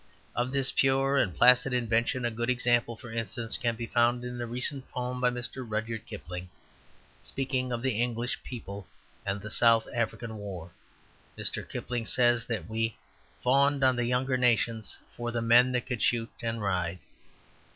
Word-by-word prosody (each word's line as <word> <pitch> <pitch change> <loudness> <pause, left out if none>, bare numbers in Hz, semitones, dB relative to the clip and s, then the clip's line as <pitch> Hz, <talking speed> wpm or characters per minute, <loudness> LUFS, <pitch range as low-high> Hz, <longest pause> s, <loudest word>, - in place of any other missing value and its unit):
Of 125 +1 0
this 135 -1 +1
pure 135 +1 +3
and 100 -8 +3
placid 125 +1 +6
invention, 120 +1 +1
a 120 - 0
good 120 +2 -2
example, 120 -2 +2
for 120 - -10
instance, 115 0 -2
can 120 -3 0
be 115 +1 -4
found 120 +1 +2
in 125 0 -5
a 120 - -3
recent 130 +3 -1
poem 125 0 -4
of 125 - +4
Mr. 120 +1 -4
Rudyard 110 0 -4
Kipling's. 90 +2 -7 0.7
Speaking 130 -1 -2
of 120 0 -3
the 125 -4 +1
English 120 0 -2
people 100 -5 -8 0.4
and 100 +1 -1
the 110 +2 -7
South 115 -1 +4
African 115 -1 -2
War 90 -5 -7 0.7
Mr. - - -2
Kipling 120 -2 -3
says 120 -1 +4
that 115 -3 -3
"we 115 +1 -1 0.5
fawned 140 +2 +3
on 130 -1 +5
the 120 0 0
younger 130 +2 +1
nations 115 -3 +1 0.2
for 120 0 -3
the 120 0 -1
men 120 +2 +5
that 125 0 0
could 125 -4 -3
shoot 115 -1 +1
and 115 -2 -2
ride." 90 -3 -1
120 Hz, 170 wpm, -29 LUFS, 115-125 Hz, 0.7 s, placid